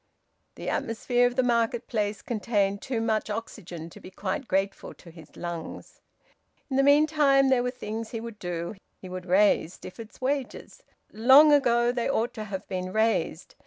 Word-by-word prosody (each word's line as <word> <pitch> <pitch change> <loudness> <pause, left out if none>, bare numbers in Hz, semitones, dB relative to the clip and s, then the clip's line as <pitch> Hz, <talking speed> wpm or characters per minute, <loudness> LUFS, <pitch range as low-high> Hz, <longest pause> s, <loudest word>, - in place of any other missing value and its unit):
The - - -8
atmosphere 245 +2 +1
of 245 - -4
the 255 - +2
marketplace 230 -3 0
contained 200 -3 -1
too 255 -4 -3
much 220 -1 0
oxygen 185 -6 -6
to - - -13
be - - -11
quite 190 +6 -4
grateful 195 +1 -2
to 170 - -15
his 160 -2 -15
lungs... 170 -2 -7 0.7
In 265 - 0
the - - +5
meantime 285 -1 +4
there 260 -2 +3
were 250 - -1
things 225 -3 -6
he 225 - -5
would 225 -2 -8
do. 170 0 -4 0.3
He 185 - -10
would 185 0 -7
raise 185 -2 +3
Stifford's 220 +4 -11
wages. 265 0 -3 0.3
Long 270 +7 +7
ago 240 -4 +3
they 245 0 -2
ought 240 -3 0
to 215 -3 -6
have 195 -2 -6
been 185 0 -4
raised. 220 +2 0
225 Hz, 165 wpm, -27 LUFS, 190-250 Hz, 0.7 s, Long